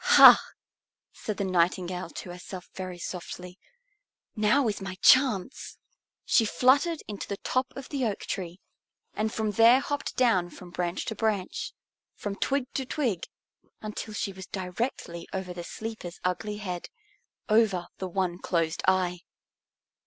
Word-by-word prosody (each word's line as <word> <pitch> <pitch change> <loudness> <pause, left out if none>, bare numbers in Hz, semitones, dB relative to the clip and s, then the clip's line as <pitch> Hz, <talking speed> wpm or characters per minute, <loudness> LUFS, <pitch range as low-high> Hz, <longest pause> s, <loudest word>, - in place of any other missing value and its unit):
"Ha!" - - +11 0.7
said 215 -3 -5
the - - -1
Nightingale 180 0 0
to 180 - -7
herself 180 +1 -8
very 185 -1 -6
softly. 180 +1 -7 0.8
"Now 225 +5 +3
is 210 -2 -2
my 190 -1 -5
chance!" 260 +4 +3 0.5
She 230 - +4
fluttered 280 +9 +3
into 205 -2 -5
the 200 - -3
top 255 +4 0
of 270 -1 -8
the 275 -3 -2
oak 210 -3 -2
tree, 180 -1 -5 0.5
and 215 +1 -1
from 220 -1 -1
there 230 +4 +7
hopped 285 +1 -3
down 220 -9 +3
from 180 0 -12
branch 175 0 -2
to 220 - -3
branch, 210 -4 -1 0.4
from 205 -1 -4
twig 275 +5 0
to 265 - -1
twig, 245 - -1 0.5
until 215 0 -6
she 200 -2 -2
was 190 -1 -9
directly 180 -2 -4
over 190 -2 -3
the 175 -1 -6
sleeper's 220 -3 -7
ugly 205 +4 -1
head, 180 -4 -5 0.6
over 215 -5 +3
the 190 - -3
one 180 -1 -1
closed 165 -3 0
eye. 185 -1 +2
195 Hz, 145 wpm, -28 LUFS, 180-225 Hz, 0.8 s, Ha